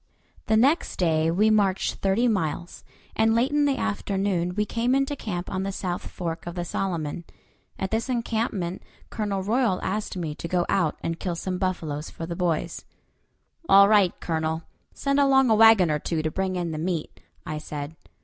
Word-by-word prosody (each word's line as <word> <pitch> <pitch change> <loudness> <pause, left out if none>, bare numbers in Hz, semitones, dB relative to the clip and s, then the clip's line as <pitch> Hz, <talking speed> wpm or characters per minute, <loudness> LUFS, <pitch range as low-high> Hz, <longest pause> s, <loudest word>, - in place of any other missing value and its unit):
The 220 - +3
next 275 +9 +2
day 160 -2 +2
we 210 +6 +3
marched 200 -3 +1
thirty 200 +6 +2
miles, 175 -5 -2 0.3
and 225 0 +3
late 250 +5 +2
in 295 0 +3
the 275 -2 +1
afternoon 190 -4 -1
we 210 0 +1
came 235 +4 0
into 275 +1 0
camp 180 -9 -4
on 185 - -3
the 195 0 -2
south 180 -2 -4
fork 170 -1 -5
of 175 - -5
the 175 -1 -3
Solomon. 170 -3 -3 0.5
At 190 - -3
this 225 +4 -1
encampment 225 -7 -2 0.3
Colonel 200 -3 -2
Royal 220 -2 +1
asked 210 0 -3
me 160 -4 -3
to 170 - -6
go 175 0 +1
out 175 -6 +1
and 165 0 -3
kill 175 -3 -2
some 180 +2 -3
buffaloes 160 -5 -2
for 165 - -7
the 170 0 -5
boys. 170 -1 -1 0.9
"All 200 0 +8
right, 205 -4 +3
Colonel; 160 0 -2 0.3
send 275 0 0
along 270 -3 +4
a - - +6
wagon 220 -6 +6
or 150 - 0
two 160 +1 -2
to 155 - -1
bring 190 +1 -1
in 175 -2 -2
the 155 - -4
meat," 165 -1 -3 0.3
I 155 -1 -4
said. 150 0 -6
185 Hz, 185 wpm, -25 LUFS, 170-220 Hz, 0.9 s, All